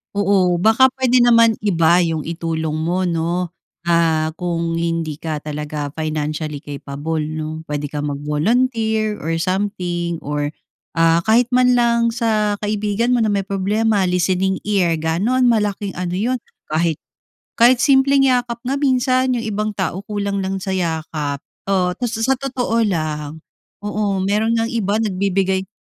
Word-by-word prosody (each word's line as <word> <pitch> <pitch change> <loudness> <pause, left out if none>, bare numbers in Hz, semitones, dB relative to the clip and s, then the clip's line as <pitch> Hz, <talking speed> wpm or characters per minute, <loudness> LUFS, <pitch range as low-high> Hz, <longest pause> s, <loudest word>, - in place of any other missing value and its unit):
Oo, 190 -3 +2
baka 225 +6 +5
pwede 250 -1 +4
naman 230 -2 +5
iba 175 -3 +3
'yong 160 -2 -2
itulong 160 -2 -2
mo 175 +4 0
'no. 170 +2 -1 0.4
Ah, 160 -2 +2
kung 170 -1 -2
hindi 165 -2 -2
ka 155 0 -4
talaga 150 0 -5
financially 155 -1 -3
capable 145 +2 -4
'no. 155 +1 -5
Puwede 150 -1 -4
ka 145 0 -4
mag-volunteer 215 - 0
or 165 +1 -1
something 175 -2 -2
or 145 0 -3 0.4
ah 165 0 +3
kahit 230 +2 +3
man 250 0 +5
lang 235 -1 +2
sa 215 -3 0
kaibigan 210 +3 0
mo 235 - +2
na 215 - +1
may 200 -1 +1
problema, 205 +2 +1
listening 185 +1 +1
ear 175 -6 +1
gano'n. 210 +11 +1
Malaking 210 -3 0
ano 180 -1 -3
'yon 235 +8 0 0.3
kahit, 160 0 0 0.6
kahit 240 +1 +5
simpleng 275 0 +4
yakap 245 -2 +1
nga 270 +3 -1
minsan 255 -2 +2
'yong 235 - -2
ibang 215 0 -2
tao 190 -1 -2
kulang 200 -1 -2
lang 190 0 -3
sa 190 - -3
yakap. 160 -5 -2 0.2
Oo 185 -2 +1
ta 245 - -1
sa 235 +3 0
totoo 245 -4 0
lang, 155 -3 -3 0.4
oo 205 -2 -1
meron 215 +4 +1
ngang 230 0 0
iba 210 -3 -1
nagbibigay. 190 -1 0
190 Hz, 145 wpm, -19 LUFS, 160-225 Hz, 0.6 s, baka